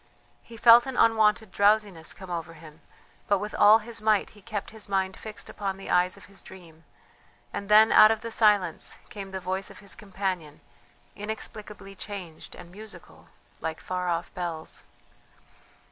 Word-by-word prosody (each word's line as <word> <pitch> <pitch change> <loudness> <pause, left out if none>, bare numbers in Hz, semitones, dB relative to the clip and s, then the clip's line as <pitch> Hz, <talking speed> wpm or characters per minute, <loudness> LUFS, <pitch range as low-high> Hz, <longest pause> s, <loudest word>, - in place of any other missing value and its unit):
He 230 - -13
felt 235 +2 +7
an 265 - -5
unwonted 220 -2 +3
drowsiness 205 -5 +2
come 190 -2 -10
over 165 -1 -5
him, 155 0 -15 0.5
but 200 - +3
with 210 +2 -5
all 210 +2 +7
his 230 0 -7
might 215 -2 +2
he 205 - -18
kept 210 -1 -5
his 220 -2 -7
mind 190 -1 0
fixed 215 -1 -9
upon 195 -2 -4
the 195 - -7
eyes 180 +1 +2
of - - -14
his 200 0 -13
dream, 165 -4 -15 0.7
and 200 0 -5
then 215 +1 +7
out 215 - +8
of 220 -1 0
the 230 - -6
silence 210 -4 +2
came 200 -2 -8
the 190 0 -5
voice 190 +1 -3
of - - -13
his 200 - -10
companion, 190 -7 -5 0.5
inexplicably 210 -1 -7
changed 190 -5 -9
and 175 - -12
musical, 215 +3 -12 0.3
like 160 0 -4
far 180 -1 -3
off 170 0 -2
bells. 165 - -5
200 Hz, 165 wpm, -27 LUFS, 180-215 Hz, 0.7 s, out